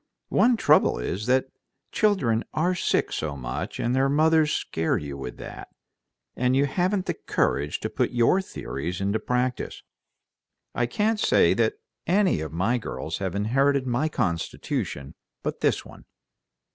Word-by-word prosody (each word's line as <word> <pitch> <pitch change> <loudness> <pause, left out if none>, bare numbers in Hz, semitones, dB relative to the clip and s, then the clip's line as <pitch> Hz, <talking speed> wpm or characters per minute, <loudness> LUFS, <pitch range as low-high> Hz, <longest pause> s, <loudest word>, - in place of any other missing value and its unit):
One 240 0 +4
trouble - - +4
is 90 - -3
that 130 +1 +2 0.4
children 130 - +2
are 175 +4 +2
sick 180 - 0
so 75 -2 -3
much, - - -5
and 120 +2 0
their 135 +1 +3
mothers 155 +1 +4
scare 80 0 0
you 70 -2 -5
with 65 -3 -7
that, - - -8 0.7
and 125 +1 +1
you 140 +1 +4
haven't 185 +6 0
the - - -1
courage 75 +2 -1
to - - -1
put - - 0
your 125 +10 +3
theories 90 - -5
into 100 +3 0
practice. 125 +1 -2 0.9
I 120 - 0
can't 210 - 0
say - - +4
that 425 - +1 0.3
any 185 - +3
of 80 - -5
my 95 +10 +1
girls 80 -7 -5
have 95 -1 -3
inherited 135 +6 +2
my 130 +5 0
constitution 85 - -3 0.3
but - - -3
this - - +1
one." - - -14
125 Hz, 150 wpm, -25 LUFS, -, 0.9 s, One